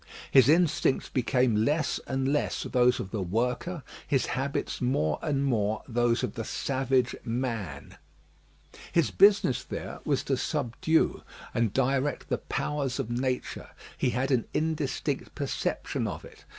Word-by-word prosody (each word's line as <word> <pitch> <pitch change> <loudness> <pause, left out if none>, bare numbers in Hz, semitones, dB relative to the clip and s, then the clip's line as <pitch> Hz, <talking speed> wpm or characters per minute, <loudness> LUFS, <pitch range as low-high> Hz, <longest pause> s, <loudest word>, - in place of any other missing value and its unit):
His 130 -1 +7
instincts 160 -4 +3
became 125 -1 +2
less 145 +8 +1
and 135 +2 0
less 150 - 0
those 125 -1 +3
of 95 - -5
the 105 - -2
worker; 125 - -1 0.2
his 135 -3 +2
habits 135 +2 -2
more 80 - +1
and 140 -3 0
more 110 -4 0
those 120 -1 +1
of - - -2
the 115 - -4
savage 130 0 0
man. 115 - -4 0.9
His 170 -3 +2
business 200 -10 +5
there - - -6
was - - 0
to - - 0
subdue 160 +7 0 0.3
and 115 -3 +1
direct 135 +3 0
the - - 0
powers 140 -4 -2
of 125 -4 -3
nature. 125 +1 -2 0.3
He - - +1
had 130 +4 -1
an 125 -4 +2
indistinct 155 -3 -1
perception - - -2
of - - -6
it. - - -15
130 Hz, 140 wpm, -28 LUFS, 115-140 Hz, 0.9 s, His